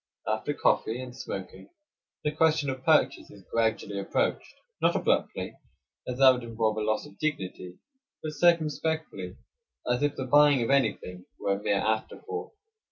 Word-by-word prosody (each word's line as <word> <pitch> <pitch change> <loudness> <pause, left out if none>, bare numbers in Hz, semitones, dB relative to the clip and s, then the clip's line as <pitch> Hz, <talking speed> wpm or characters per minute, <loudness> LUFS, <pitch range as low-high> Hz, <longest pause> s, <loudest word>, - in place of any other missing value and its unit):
After 110 +7 -1
coffee 115 +3 +1
and 125 -1 -8
smoking 95 -6 -7 0.5
the 150 - +1
question 155 -2 +2
of 130 0 -7
purchase 155 0 +3
is 100 -3 -15
gradually 110 -3 0
approached; 100 - -1 0.3
not - - +3
abruptly, - - 0 0.5
as 125 - -3
that 135 -1 +8
would 125 -1 -2
involve 110 -2 -1
a - - -1
loss 110 +4 0
of 150 - -15
dignity; 95 - -3 0.5
but 155 - -3
circumspectly, 155 - 0 0.5
as 125 +1 +1
if 145 -1 +1
the 130 - -4
buying 145 -1 +5
of 115 - 0
anything 100 -9 0
were 100 - +1
a 100 - -4
mere 100 -1 +1
afterthought. 110 - -3
125 Hz, 155 wpm, -28 LUFS, 110-150 Hz, 0.5 s, that